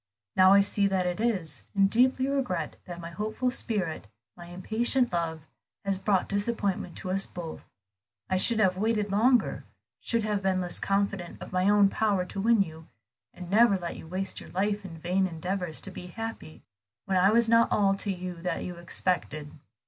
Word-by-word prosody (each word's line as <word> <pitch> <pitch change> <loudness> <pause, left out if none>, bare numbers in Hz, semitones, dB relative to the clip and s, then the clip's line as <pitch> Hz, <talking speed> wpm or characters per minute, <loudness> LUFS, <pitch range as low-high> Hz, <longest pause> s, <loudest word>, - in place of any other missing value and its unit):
"Now 185 +1 +7
I 200 - +7
see 200 0 +2
that 190 -2 0
it 180 +2 -2
is, 180 - -1
and 195 -1 +5
deeply 255 +5 +3
regret 250 - -2
that 175 -1 -8
my 170 0 -7
hopeful 215 +7 -2
spirit, 190 - -1 0.3
my 175 -1 -11
impatient 220 +7 0
love, 160 -2 -2 0.4
has 195 -1 -1
brought 195 -2 +1
disappointment 200 -4 -1
to 185 - -4
us 195 +1 0
both. 170 -3 -8 0.6
I 185 - 0
should 230 +4 +4
have 185 -3 +3
waited 210 0 0
longer, 240 +5 +2 0.4
should 230 -2 -1
have 210 -2 -1
been 190 -1 +1
less 175 -1 -4
confident 195 -3 -1
of - - -9
my 185 +2 +2
own 205 -1 +6
power 200 -2 0
to 195 +2 -5
win 225 -1 +4
you, 160 -2 -12 0.4
and 180 - -10
never 215 -1 +5
let 175 -2 -5
you - - -10
waste 185 +3 -3
your - - -12
life 205 +2 -1
in 170 -4 -9
vain 180 +4 0
endeavors 180 0 -3
to 195 - -3
be 180 -1 -8
happy 225 -4 -7 0.4
when 190 -1 +1
I 190 +2 +5
was 230 +2 +4
not 230 0 +4
all 200 -2 +3
to 200 - -1
you 180 -2 -6
that 180 -1 -2
you 175 -1 -6
expected. 170 -4 -2
195 Hz, 185 wpm, -28 LUFS, 180-210 Hz, 0.6 s, Now